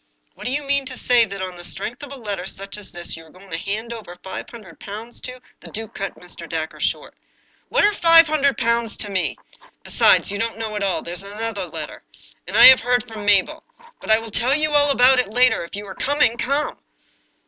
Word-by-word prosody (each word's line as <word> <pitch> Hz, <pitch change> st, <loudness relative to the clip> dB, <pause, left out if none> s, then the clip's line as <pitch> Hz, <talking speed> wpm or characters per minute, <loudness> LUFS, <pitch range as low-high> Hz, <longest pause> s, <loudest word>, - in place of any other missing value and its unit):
" -, -, -45 dB
And -, -, -11 dB
do -, -, -1 dB
you 290 Hz, +2 st, -1 dB
mean 280 Hz, -1 st, 0 dB
to 255 Hz, -1 st, -6 dB
say 245 Hz, -2 st, +4 dB
that 200 Hz, -2 st, -6 dB
on 185 Hz, -1 st, -6 dB
the 175 Hz, -, -10 dB
strength 235 Hz, +6 st, -4 dB
of 285 Hz, -2 st, -9 dB
a -, -, -6 dB
letter 200 Hz, -5 st, -5 dB
such 195 Hz, 0 st, -6 dB
as 210 Hz, -2 st, -8 dB
this 175 Hz, 0 st, -2 dB
you 165 Hz, -, -11 dB
are 160 Hz, -, -18 dB
going 185 Hz, +3 st, -17 dB
to -, -, -2 dB
hand 220 Hz, +4 st, -4 dB
over 215 Hz, -6 st, -9 dB
five 190 Hz, -1 st, -7 dB
hundred 210 Hz, -8 st, -13 dB
pounds 220 Hz, +4 st, -8 dB
to 255 Hz, 0 st, -8 dB
" -, -, -33 dB
The -, -, -9 dB
duke 220 Hz, 0 st, -6 dB
cut 195 Hz, -, -5 dB
Mr. 175 Hz, -2 st, -11 dB
Dacre 160 Hz, -1 st, -4 dB
short. -, -, -2 dB, 0.6 s
"What -, -, +2 dB
are 415 Hz, -, +3 dB
five 330 Hz, -3 st, +7 dB
hundred 290 Hz, -3 st, +1 dB
pounds 235 Hz, -2 st, 0 dB
to 205 Hz, -, -4 dB
me? 180 Hz, -7 st, -1 dB, 0.5 s
Besides, -, -, +4 dB
you 200 Hz, -, -4 dB
don't 225 Hz, 0 st, -2 dB
know 220 Hz, -1 st, -4 dB
all. 195 Hz, -3 st, -1 dB
There 170 Hz, -, -6 dB
is 180 Hz, -, -2 dB
another 205 Hz, -1 st, -5 dB
letter. -, -, -7 dB, 0.5 s
And -, -, -2 dB
I -, -, +10 dB
have 260 Hz, 0 st, +10 dB
heard 245 Hz, +1 st, 0 dB
from 220 Hz, -3 st, -8 dB
Mabel. 205 Hz, +11 st, +2 dB, 0.4 s
But -, -, -11 dB
I 220 Hz, -, +6 dB
will 225 Hz, 0 st, -7 dB
tell 245 Hz, +6 st, +1 dB
you 305 Hz, 0 st, +1 dB
all 290 Hz, -1 st, +4 dB
about 260 Hz, -1 st, +5 dB
it 250 Hz, -, +1 dB
later. 250 Hz, +2 st, +3 dB
If 170 Hz, -, -10 dB
you 205 Hz, +1 st, -7 dB
are 190 Hz, -, -8 dB
coming, 265 Hz, 0 st, +1 dB
come 280 Hz, +5 st, -2 dB
225 Hz, 240 wpm, -21 LUFS, 195-255 Hz, 0.6 s, I